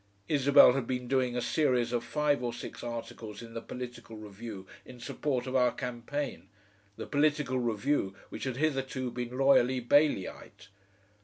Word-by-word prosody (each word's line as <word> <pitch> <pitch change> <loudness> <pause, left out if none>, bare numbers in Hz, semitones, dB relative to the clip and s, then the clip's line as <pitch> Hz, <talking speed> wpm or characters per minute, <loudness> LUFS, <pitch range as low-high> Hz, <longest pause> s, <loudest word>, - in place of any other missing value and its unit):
Isabel 140 -3 +6
had 130 -3 -2
been 125 -1 -2
doing 130 -1 +1
a 120 - -1
series 125 -2 +1
of 120 - 0
five 150 -3 +1
or 120 -1 -1
six 120 - -8
articles 115 -2 -6
in 115 -1 -11
the 115 - -5
POLITICAL 120 -3 -8
REVIEW 105 -1 -8 0.2
in 125 -1 -13
support 125 +1 -2
of 130 0 -4
our 125 -2 +4
campaign, 125 +3 -5 0.5
the - - -5
POLITICAL 145 -3 +1
REVIEW 115 -3 0
which - - -6
had 130 -2 -3
hitherto 135 -4 -1
been 120 +1 -5
loyally 130 -2 +4
Baileyite. 125 -7 +1
125 Hz, 155 wpm, -30 LUFS, 120-135 Hz, 0.5 s, Isabel